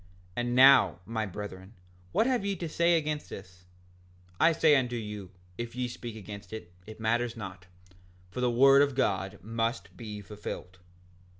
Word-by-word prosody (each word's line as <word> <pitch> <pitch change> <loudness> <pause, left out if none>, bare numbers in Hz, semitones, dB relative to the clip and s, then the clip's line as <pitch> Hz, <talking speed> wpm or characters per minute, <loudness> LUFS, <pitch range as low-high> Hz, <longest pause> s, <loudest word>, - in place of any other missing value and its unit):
And 120 0 -1
now, 130 - +7
my 110 0 -2
brethren, 95 +1 -8 0.4
what 220 - +3
have 250 -5 +1
ye 200 0 -1
to 170 -2 -4
say 170 +2 +3
against 150 -1 -3
this? 95 -2 -11 0.7
I 170 - +6
say 160 -2 +5
unto 125 -3 +1
you, 105 -4 -6 0.3
if 120 0 -5
ye 125 0 -1
speak 120 -1 -7
against 100 -2 -9
it, 90 -6 -8
it 110 0 -10
matters 115 +1 0
not, 95 -3 -8 0.6
for 125 - -4
the 125 - +3
word 135 +3 +6
of 140 -2 +2
God 95 -6 0
must 115 +3 -2
be 105 -3 -7
fulfilled. 100 -3 -8
115 Hz, 165 wpm, -29 LUFS, 100-135 Hz, 0.7 s, now